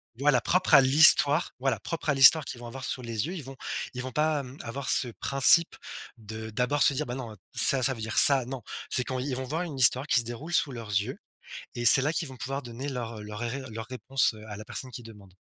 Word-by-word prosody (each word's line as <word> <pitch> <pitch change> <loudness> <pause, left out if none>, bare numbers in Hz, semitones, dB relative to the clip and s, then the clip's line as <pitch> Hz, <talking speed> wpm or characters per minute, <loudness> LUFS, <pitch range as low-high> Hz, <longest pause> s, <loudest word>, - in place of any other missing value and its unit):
Voilà, 135 -1 +1
propre 185 +2 0
à 140 - +8
l'histoire, 145 +2 +4
voilà 130 -6 -2
propre 165 - -6
à 140 - +1
l'histoire 140 +3 +6
qu'ils 120 - -9
vont 120 - -11
avoir 130 +2 -9
sous 125 - -4
les 115 +3 -4
yeux. 180 - -6
Ils 155 - -8
vont 135 +1 -11 0.4
ils 125 - -6
vont 130 0 -7
pas, 150 +2 -1
hem, 130 +1 -10
avoir 130 +4 -6
ce 125 - +3
principe 140 +8 +4 0.4
de 110 0 -9
d'abord 125 +6 -2
se 140 - +3
dire: 150 +2 -3
«Bah 120 - -7
non 120 -5 -8 0.2
ça, 135 -2 +4
ça 130 - +1
veut 115 - -10
dire 110 +1 -5
ça», 135 -3 +5
non. 130 -2 -8 0.3
C'est 125 - -1
quand 130 -1 -5
ils 130 0 -4
vont 130 - -5
voir 155 +6 -4
une 155 -6 -7
histoire 130 +3 +2
qui - - +2
se - - -5
déroule 140 +9 -7
sous 140 - +1
leurs 115 -3 -9
yeux 100 0 -3 0.6
et 120 - -5
c'est 135 - +9
là 155 +3 -1
qu'ils 165 - -3
vont 130 - -11
pouvoir 135 +4 -5
donner 125 +4 -8
leur 115 -4 -6
leur 105 +1 -9
ré 120 +3 -5
leurs 115 +1 -8
réponses 130 -1 -1
à 105 - -8
la 110 - -10
personne 130 +4 -7
qui 120 -1 -10
demande. 100 -5 -16
130 Hz, 250 wpm, -26 LUFS, 115-140 Hz, 0.6 s, c'est